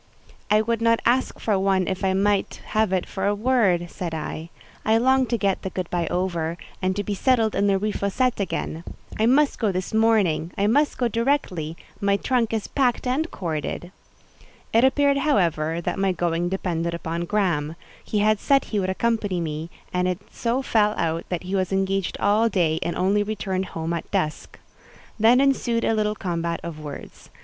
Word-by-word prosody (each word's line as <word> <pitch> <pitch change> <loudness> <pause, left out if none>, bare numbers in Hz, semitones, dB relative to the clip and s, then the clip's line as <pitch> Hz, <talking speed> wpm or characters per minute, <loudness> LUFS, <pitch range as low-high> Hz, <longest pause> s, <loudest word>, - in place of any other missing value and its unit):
"I 210 +1 +5
would 230 0 -1
not 230 0 +3
ask 255 +2 +1
for 205 -4 +1
one 190 -1 +2
if 190 +1 -3
I 190 -1 +2
might 200 +1 +1
have 215 -2 +1
it 185 -2 0
for 195 0 -3
a 205 - +2
word," 205 -7 +2
said 175 -4 -4
I. 160 +1 -5 0.3
"I 220 +1 +3
long 260 +2 +3
to 235 - 0
get 200 -3 0
the 190 - -4
good 185 -2 -4
by 175 -2 0
over, 170 -2 -1 0.2
and 185 0 0
to 205 - -1
be 205 - -3
settled 225 +1 +2
in 200 - +1
the 195 -1 +3
Rue 210 +2 -1
Fossette 230 +5 0
again. 170 -4 -3 0.4
I 220 - +3
must 280 +3 +3
go 215 -4 +1
this 185 +2 -4
morning: 210 -7 +2
I 200 - +2
must 285 +8 +2
go 245 - +1
directly; 230 - -1 0.2
my 200 -1 +2
trunk 240 0 0
is 220 -2 -1
packed 255 -4 +1
and 280 +6 0
corded." 170 0 -4 0.8
It 230 +2 +5
appeared; 280 +1 +3
however, 170 - +1
that 180 - -3
my 195 -1 +2
going 175 0 -1
depended 170 -3 -2
upon 170 +1 -3
Graham; 170 -6 0 0.3
he 215 - -2
had 215 0 +3
said 275 -1 +3
he 210 - -2
would 185 -1 -1
accompany, 205 -2 0
me, 160 0 -4 0.2
and 180 0 +1
it 180 -1 0
so 245 +3 -1
fell 210 -3 +2
out 165 0 -1
that 180 -1 -3
he 185 +2 -5
was 190 -1 0
engaged 195 -1 0
all 215 +3 +3
day, 165 -6 +1
and 170 - -2
only 195 +3 +2
returned 195 -3 -2
home 165 +1 -4
at 170 - -4
dusk. 155 0 -2 0.6
Then 230 +4 +6
ensued 255 -4 +2
a - - +2
little 210 -1 0
combat 170 -3 -2
of 165 -2 -6
words. 145 -2 -9
Mrs. - - -25
195 Hz, 195 wpm, -24 LUFS, 175-225 Hz, 0.8 s, Then